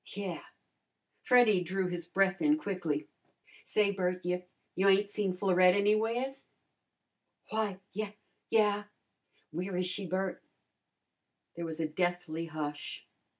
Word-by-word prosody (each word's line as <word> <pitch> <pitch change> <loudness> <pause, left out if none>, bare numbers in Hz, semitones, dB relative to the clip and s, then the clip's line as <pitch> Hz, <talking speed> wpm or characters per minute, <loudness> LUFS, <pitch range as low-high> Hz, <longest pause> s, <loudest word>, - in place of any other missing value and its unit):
"Yeah." 195 -4 -4 0.8
Freddy 240 -7 +5
drew 185 +2 -1
his 175 -2 -4
breath 195 +1 +2
in 300 0 +4
quickly. 180 - -2 0.6
"Say, 210 -1 +2
Bert, 180 -2 -1
you 180 0 -1 0.3
you 195 +2 +3
ain't 200 +1 +4
seen 205 -3 0
Florette 185 -1 +4
anywheres?" 225 +6 +1 1.1
"Why, 215 -3 0 0.2
ye 210 +1 -4 0.3
yeah." 210 -2 +3 0.7
"Where 180 +3 -3
is 180 - +1
she, 185 +1 -2
Bert?" 185 +1 -2 1.1
There 170 0 -4
was 160 0 -5
a 160 - +1
deathly 175 0 -1
hush. 150 -2 -5
190 Hz, 120 wpm, -32 LUFS, 175-205 Hz, 1.1 s, Freddy